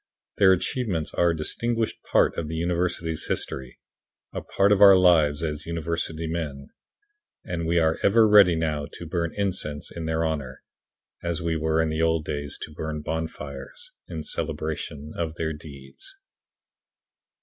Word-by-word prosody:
Their 95 Hz, -2 st, +6 dB
achievements 95 Hz, -3 st, -1 dB
are 85 Hz, -, +3 dB
a 85 Hz, -, +1 dB
distinguished 115 Hz, +8 st, -1 dB
part -, -, +2 dB
of 80 Hz, -, -3 dB
the 80 Hz, -, -4 dB
university's 85 Hz, -1 st, -1 dB
history 65 Hz, -2 st, -3 dB, 0.6 s
a -, -, -3 dB
part 100 Hz, +1 st, +2 dB
of 105 Hz, -1 st, +4 dB
our 100 Hz, -1 st, +10 dB
lives 80 Hz, -5 st, +4 dB
as 75 Hz, -1 st, -3 dB
university 85 Hz, -1 st, -2 dB
men 75 Hz, -4 st, -4 dB, 0.8 s
and 85 Hz, -2 st, -3 dB
we 85 Hz, +1 st, +2 dB
are 80 Hz, -1 st, +2 dB
ever 110 Hz, +2 st, +5 dB
ready 100 Hz, -5 st, +7 dB
now 75 Hz, -3 st, -1 dB
to 85 Hz, -, -8 dB
burn 85 Hz, 0 st, -1 dB
incense 90 Hz, -7 st, -3 dB
in 85 Hz, -1 st, -6 dB
their 80 Hz, 0 st, 0 dB
honor, 70 Hz, -5 st, -4 dB, 0.6 s
as 85 Hz, 0 st, -2 dB
we 85 Hz, -1 st, 0 dB
were 80 Hz, 0 st, +1 dB
in 80 Hz, -1 st, +2 dB
the 80 Hz, +1 st, -1 dB
old 80 Hz, -1 st, +2 dB
days 70 Hz, -1 st, -4 dB
to 75 Hz, -, -8 dB
burn 75 Hz, 0 st, -4 dB
bonfires, 75 Hz, -4 st, -6 dB, 0.2 s
in 80 Hz, -1 st, -5 dB
celebration 75 Hz, -1 st, -4 dB
of 80 Hz, -2 st, -3 dB
their 80 Hz, -1 st, -2 dB
deeds. 70 Hz, -, -11 dB
80 Hz, 155 wpm, -25 LUFS, 75-85 Hz, 0.8 s, our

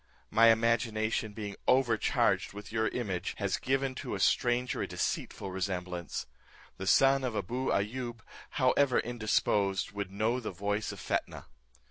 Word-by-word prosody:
My 115 Hz, +2 st, +6 dB
imagination 110 Hz, -1 st, +2 dB
being 105 Hz, -2 st, -5 dB
overcharged 120 Hz, -7 st, +2 dB
with 105 Hz, +1 st, -9 dB
your 110 Hz, 0 st, +1 dB
image, 100 Hz, -6 st, -3 dB
has 100 Hz, -2 st, 0 dB
given 135 Hz, 0 st, 0 dB
to -, -, -4 dB
a -, -, -5 dB
stranger 120 Hz, +4 st, +2 dB
a -, -, -2 dB
deceitful 95 Hz, -, -3 dB
resemblance. 90 Hz, -3 st, -3 dB, 0.5 s
The 95 Hz, -, -5 dB
son 135 Hz, +5 st, +5 dB
of 125 Hz, -3 st, -2 dB
Abou 120 Hz, +7 st, -2 dB
Ayoub, 120 Hz, +3 st, -2 dB, 0.4 s
however 130 Hz, 0 st, +3 dB
indisposed, 105 Hz, -4 st, +1 dB
would 100 Hz, -2 st, -4 dB
know 110 Hz, +5 st, 0 dB
the 115 Hz, -, -4 dB
voice 105 Hz, +2 st, -2 dB
of -, -, -9 dB
Fetnah." -, -, -3 dB
110 Hz, 140 wpm, -31 LUFS, 100-120 Hz, 0.5 s, My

